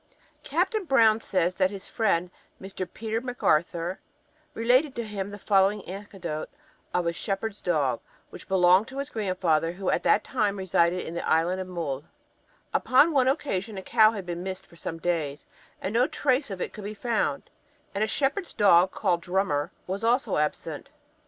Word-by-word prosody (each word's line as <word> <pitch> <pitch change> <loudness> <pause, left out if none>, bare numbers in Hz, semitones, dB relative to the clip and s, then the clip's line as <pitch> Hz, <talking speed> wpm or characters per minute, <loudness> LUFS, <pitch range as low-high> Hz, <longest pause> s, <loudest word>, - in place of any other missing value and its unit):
Captain 435 -3 0
Brown 225 -8 +4
says 185 -4 0
that 185 0 +2
his 200 -1 -7
friend, 180 -5 0 0.3
Mr. 190 -1 -6
Peter 225 +1 -3
Macarthur, 175 -7 0 0.6
related 255 +5 +3
to 235 - -2
him 205 -3 -4
the 205 - -8
following 200 0 +2
anecdote 185 -4 -6 0.4
of 180 -1 0
a 170 - 0
shepherd's 195 +5 -3
dog, 145 -9 +1 0.3
which - - -11
belonged 185 +2 +4
to 265 - -9
his 280 +1 -4
grandfather, 180 -6 0
who 190 +1 -1
at - - +1
that - - +3
time 210 -6 0
resided 180 -1 +1
in 165 - -6
the 170 - -3
Island 175 +4 +2
of 185 - -6
Mull: 160 -7 -4 0.7
Upon 285 +6 +4
one 265 -4 +3
occasion 220 - -1
a 190 - -6
cow 215 +2 +5
had 200 -4 -5
been 175 0 -4
missed 190 0 -5
for - - -19
some 165 0 -5
days, 160 -4 -2 0.3
and 190 - -3
no 245 +3 +4
trace 275 -3 0
of 195 -2 -5
it - - -3
could 210 - -9
be 210 +2 -5
found; 230 +1 -1 0.4
and 200 +1 0
a - - +1
shepherd's 290 - -1
dog, 185 -3 +5
called 180 -4 0
Drummer, 175 -5 0 0.2
was 195 +4 -4
also 235 -2 +2
absent. 150 0 -2
195 Hz, 175 wpm, -27 LUFS, 175-225 Hz, 0.7 s, cow